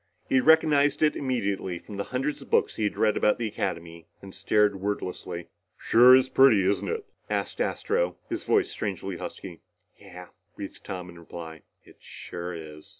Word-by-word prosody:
He 130 - +3
recognized 145 -1 +4
it 155 - +3
immediately 100 -9 -2
from 100 +3 -10
the 100 - -3
hundreds 135 +3 -3
of 135 - -13
books - - +2
he 110 - -1
had 105 - -2
read 110 -1 +2
about 105 - +2
the 115 - -2
Academy 85 -5 -5
and 95 -1 -12
stared 105 -2 +1
wordlessly. 90 -3 -4 0.3
"Sure 125 +2 +7
is 130 0 +3
pretty, 130 -8 +5
isn't 100 +2 0
it?" 455 -2 -3 0.2
asked - - -2
Astro, - - -1
his - - -4
voice 410 -4 +2
strangely 95 -2 -4
husky. - - -8 0.4
"Yeah," - - -12 0.3
breathed - - -9
Tom 90 -1 -6
in 85 - -14
reply. 80 -1 -9 0.2
"It - - -19
sure 85 0 -7
is." 75 -2 -10
105 Hz, 170 wpm, -26 LUFS, 90-135 Hz, 0.4 s, Sure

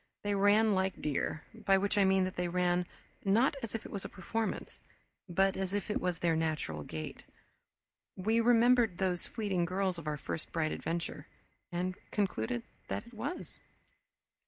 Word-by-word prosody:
They 205 0 +1
ran 205 +2 +5
like 190 0 0
deer, 150 +1 -1
by 195 -1 +3
which 200 +2 +1
I 200 -1 +5
mean 190 0 +4
that 185 0 -2
they 180 0 0
ran 180 0 +1 0.4
not 220 +7 +4
as 230 -1 -4
if 225 - -4
it - - -8
was 200 - -3
a - - -5
performance, 220 +4 -3 0.5
but 195 +2 +3
as 190 +1 -2
if 205 +1 -2
it - - 0
was 180 -2 0
their 165 -1 +2
natural 155 - -1
gait. 80 +1 -6 0.9
We 220 +5 +2
remembered 235 -3 +5
those 185 -2 0
fleeting 195 -6 0
girls 185 0 0
of 160 - -9
our 150 0 -1
first 155 +3 -4
bright 160 -2 0
adventure, 165 -3 -3 0.4
and 180 +1 -1 0.2
concluded 120 - -1 0.2
that 95 - -3
it 235 - -15
was. 235 +10 -4
185 Hz, 170 wpm, -33 LUFS, 170-205 Hz, 0.9 s, ran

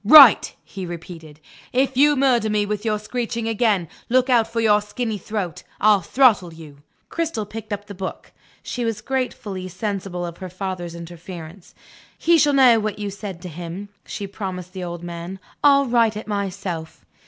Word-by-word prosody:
"Write," 270 +1 +9
he 190 - -7
repeated. 165 -3 -8 0.3
"If 265 +1 +1
you 295 +3 +5
murder 250 -5 +3
me 210 -1 +1
with 210 0 -3
your 215 -2 +1
screeching 230 +1 -3
again, 215 -6 +1 0.2
look 255 +2 +3
out 235 -3 +4
for 230 - -3
your 210 -2 +4
skinny 210 +1 -3
throat 190 -3 -4 0.2
I'll 210 -2 +5
throttle 210 -3 +3
you." 155 -3 -12 0.3
Cristel 325 -10 -2
picked 220 +1 -8
up 205 0 -3
the 205 - -8
book. 190 0 -6 0.3
She 245 - -3
was 225 -2 -1
gratefully 215 -6 -3
sensible 190 -2 -3
of 170 -1 -7
her 185 - -6
father's 185 -2 -5
interference. 170 +1 -10 0.4
"He 335 -1 +4
shall 290 -1 +4
know 255 -4 +6
what 215 -1 -2
you 205 -1 -4
said 195 -3 -7
to - - -5
him," 175 +4 -7
she 205 - -5
promised 185 -3 -6
the 185 -2 -5
old 175 -1 -6
man. 175 +2 -6 0.3
"I'll 280 -1 +6
write 230 -3 +2
it 215 - -6
myself." 185 - -4
205 Hz, 175 wpm, -22 LUFS, 180-230 Hz, 0.4 s, Write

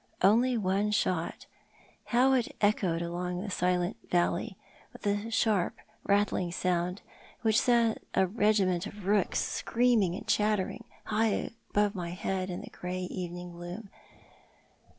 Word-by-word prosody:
Only 235 +6 +4
one 200 0 +1
shot! 185 -5 -1 0.6
How 255 +2 +4
it 250 -3 0
echoed 190 -5 +2
along 180 +1 -3
the 205 - -5
silent 180 +2 0
valley, 175 +1 0 0.4
with - - -12
a 205 +2 0
sharp, 215 -5 +1 0.3
rattling 200 -3 +1
sound, 180 +1 -1 0.4
which 220 -1 +4
set 235 -2 +3
a 190 - +4
regiment 195 -3 +2
of 205 -2 -10
rooks 205 -1 +2
screaming 230 -7 +1
and - - -8
chattering 210 +2 +1 0.2
high 220 0 0 0.2
above 205 0 +2
my 175 -4 -4
head 185 +1 -2
in 180 - -4
the - - -10
grey 180 +1 -4
evening 180 -1 -5
gloom. 175 +4 -8
195 Hz, 130 wpm, -30 LUFS, 180-215 Hz, 0.6 s, Only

